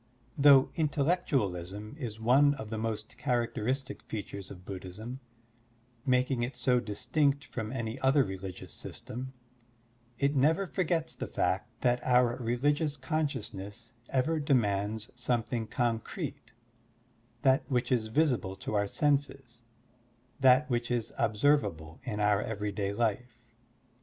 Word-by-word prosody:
Though 140 -2 +7
intellectualism 135 - 0
is 110 -6 -5
one 135 +5 +5
of 110 -5 -8
the 110 - -2
most 115 +2 -4
characteristic 125 +1 -1
features 100 -2 -6
of 90 -1 -11
Bud 95 -2 -6
dhism, 110 +8 -7 0.9
making 125 0 +2
it 125 +3 -3
so 125 -1 +3
distinct 140 +6 0
from 110 -2 -5
any 115 -1 -3
other 135 +1 +4
religious 95 -3 -6
system, 130 +3 -7 0.8
it 140 +1 +1
never 160 +8 +3
forgets 170 -3 -1
the - - -5
fact 95 +4 0
that 125 -1 +2
otir 125 -1 +3
religious 145 +5 +1
consciousness 120 -7 -4 0.2
ever 155 +5 +1
demands 110 -6 +1
some 125 -1 0
thing 115 -1 -3
concrete, 115 -1 -3 0.9
that 135 +2 +5
which 125 -1 0
is 115 -4 +2
visible 125 -7 +1
to - - -6
our 100 -1 +2
senses, 140 -3 -1 0.8
that 130 +2 +6
which 120 -3 -1
is 120 -2 -1
observable 105 - +1
in 105 -4 -3
our 105 -1 +3
everyday 105 -2 -2
life. 115 +2 -1
120 Hz, 125 wpm, -30 LUFS, 105-140 Hz, 0.9 s, Though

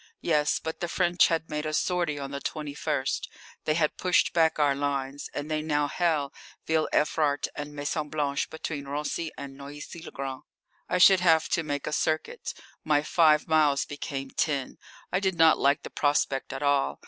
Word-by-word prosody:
Yes, 150 -3 +2
but 160 0 -5
the 175 - -2
French 175 0 +3
had 165 -1 -1
made 150 0 -2
a 155 0 -2
sortie 175 -3 0
on 140 -1 -5
the 140 0 -5
21st, 150 -2 -2 0.4
they 155 - +1
had 155 -2 +1
pushed 180 -1 +2
back 160 -2 +3
our 145 -2 +3
lines, 140 0 -3
and 145 - -4
they 155 0 0
now 150 -1 0
held 155 -3 0 0.3
Ville 160 -1 +1
Evrart 150 -1 +1
and 145 0 -6
Maison 150 +1 -2
Blanche 145 -2 -1
between 155 -2 -5
Raincy 150 +3 -3
and 140 -1 -8
Noisy 145 +4 -9
le - - -8
Grand. 135 0 -5 0.5
I - - +1
should 190 +1 +7
have 165 -3 +3
to 170 - +1
make 145 -2 -3
a - - -3
circuit; 155 - -1 0.3
my 150 -1 +2
five 155 -2 +4
miles 150 -3 +3
became 135 -2 -5
ten. 140 -4 -1 0.3
I 180 - +2
did 190 -2 0
not 160 -1 +5
like 140 +1 +2
the - - -8
prospect 145 -2 0
at 135 - -5
all. 140 - +1
150 Hz, 185 wpm, -27 LUFS, 140-160 Hz, 0.5 s, should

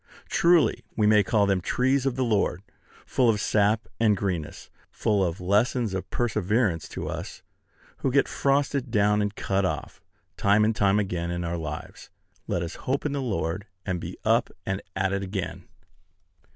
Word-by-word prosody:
Truly 170 -8 +3
we 105 - +2
may 105 0 +6
call 100 +1 +2
them 95 -2 +1
trees 130 +6 +1
of 130 - 0
the 130 - 0
Lord, 100 -5 0 0.4
full 125 -3 +2
of 105 -2 +2
sap 105 +2 +2
and 110 -3 +3
greenness; 90 -6 -4 0.2
full 105 -3 +1
of 85 -1 -2
lessons 105 +4 +1
of 95 - -4
perseverance 105 -5 0
to - - -5
us - - -6 0.5
who 135 - -1
get 140 +2 +3
frosted 140 -1 0
down 105 -2 +3
and 105 0 -2
cut 100 0 0
off, 90 - -3 0.4
time 105 +2 +4
and 110 0 +1
time 100 -1 +3
again, 90 -4 -1
in 85 0 -2
our 85 0 -2
lives. 75 -2 -7 0.4
Let 85 - -1
us 85 - -5 0.2
hope 140 +3 0
in 145 - 0
the 140 -1 -2
Lord, 100 -4 -2 0.2
and 95 -3 -2
be - - -7
up - - +3 0.2
and 95 0 -2
at 95 0 0
it 100 - -1
again. 95 -1 -5
105 Hz, 175 wpm, -26 LUFS, 95-120 Hz, 0.5 s, may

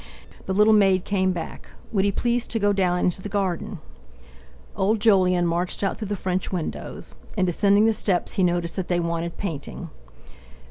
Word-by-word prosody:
The 190 - -1
little 210 +2 +5
maid 195 -3 +4
came 190 -2 +1
back. 175 -3 -6 0.2
Would 195 -3 +1
he 200 - +2
please 240 +3 0
to 230 - -1
go 205 -1 +2
down 185 -2 +1
into 180 +1 0
the 205 - -6
garden? 195 -4 -2 1.0
Old 210 +3 +1
Jolyon 185 -5 +3
marched 175 +3 -1
out 195 - -1
through 215 - -4
the 205 0 -3
French 185 0 -2
windows. 175 -4 -5 0.2
In 185 - +3
descending 200 +4 +3
the 225 - +4
steps 190 -5 0
he 190 - +1
noticed 175 0 0
that 185 - -2
they 175 -1 +1
wanted 170 0 -3
painting. 165 -8 -5
190 Hz, 180 wpm, -24 LUFS, 175-205 Hz, 1.0 s, little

